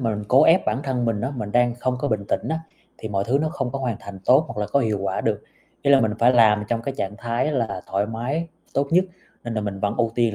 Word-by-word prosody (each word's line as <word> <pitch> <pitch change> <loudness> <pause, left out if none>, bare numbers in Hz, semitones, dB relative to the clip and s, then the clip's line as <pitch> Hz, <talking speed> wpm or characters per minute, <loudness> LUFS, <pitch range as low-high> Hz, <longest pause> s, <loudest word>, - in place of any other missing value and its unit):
mà 115 -3 0
mình 105 - -5
cố 130 - +6
ép 170 +4 +5
bản - - +1
thân 130 -3 -1
mình 115 -3 0
á, 130 +5 -2
mình 105 -4 -5
đang 120 0 +3
không 125 +1 -1
có 145 - -1
bình 105 -3 -1
tĩnh - - -1
á, 160 - 0 0.4
thì 110 - -6
mọi 100 -1 -1
thứ 125 +6 +2
nó 155 +1 0
không 135 -7 -3
có 135 - -2
hoàn 125 -5 -2
thành 100 -1 -9
tốt 135 +5 +5
hoặc 105 - -5
là 105 - -1
có 140 +8 +1
hiệu 110 -4 0
quả 95 -1 -1
được, - - -1 0.4
ý 140 - +2
là 140 -1 +7
mình 110 -3 +1
phải 120 +2 +5
làm 105 -3 +5
trong 115 -1 -1
cái 135 +2 -4
trạng 100 +2 -3
thái 120 +6 -1
là 115 -8 -2
thoải 100 +2 +1
mái 125 +9 -3 0.3
tốt 140 +1 +1
nhất, 180 +3 +4 0.4
nên 120 -1 -4
là 110 - 0
mình 100 -2 -4
vẫn 100 +1 0
ưu 115 -2 +1
tiên 115 -3 +1
120 Hz, 290 wpm, -23 LUFS, 105-135 Hz, 0.4 s, là